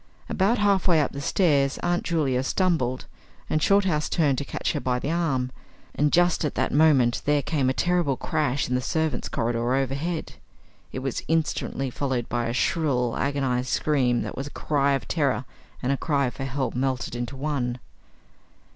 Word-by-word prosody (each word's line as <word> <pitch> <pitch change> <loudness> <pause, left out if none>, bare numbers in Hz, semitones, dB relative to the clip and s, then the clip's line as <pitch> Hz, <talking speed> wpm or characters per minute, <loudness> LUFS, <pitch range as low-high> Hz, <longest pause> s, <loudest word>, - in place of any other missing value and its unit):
About 200 +6 +2
half 200 -3 +2
way 170 -3 +5
up 145 - +1
the 140 - -6
stairs 145 -4 +2
Aunt 175 0 +1
Julia 145 -7 +1
stumbled 135 -5 0 0.5
and 155 - +1
Shorthouse 190 -5 +2
turned 145 -6 +2
to - - -2
catch - - -2
her 150 - -1
by 125 -2 0
the 140 +5 -2
arm, 135 -7 0 0.4
and 150 0 +1
just 175 -1 +3
at 150 - -2
that - - 0
moment 140 -6 +4
there 145 -1 +2
came 140 -3 0
a - - +1
terrific 175 -5 +1
crash 145 -4 -1
in 125 - -2
the 125 - +1
servants' 160 +2 -1
corridor 120 +2 0
overhead. 140 +5 -2 0.6
It 130 - -5
was 135 -3 -2
instantly 155 -4 -1
followed 130 -3 -2
by 120 -1 -1
a - - -1
shrill, 125 -3 +1
agonised 135 -3 -1
scream 130 -5 +1
that - - -6
was 135 +2 -4
a - - -6
cry 140 -1 0
of 135 -5 -2
terror 140 -5 0 0.4
and 130 - +1
a 140 - +1
cry 140 -4 0
for 135 - -6
help 135 0 -2
melted 130 -1 -1
into 120 +2 -4
one. 135 -3 -2
140 Hz, 180 wpm, -25 LUFS, 125-160 Hz, 0.6 s, way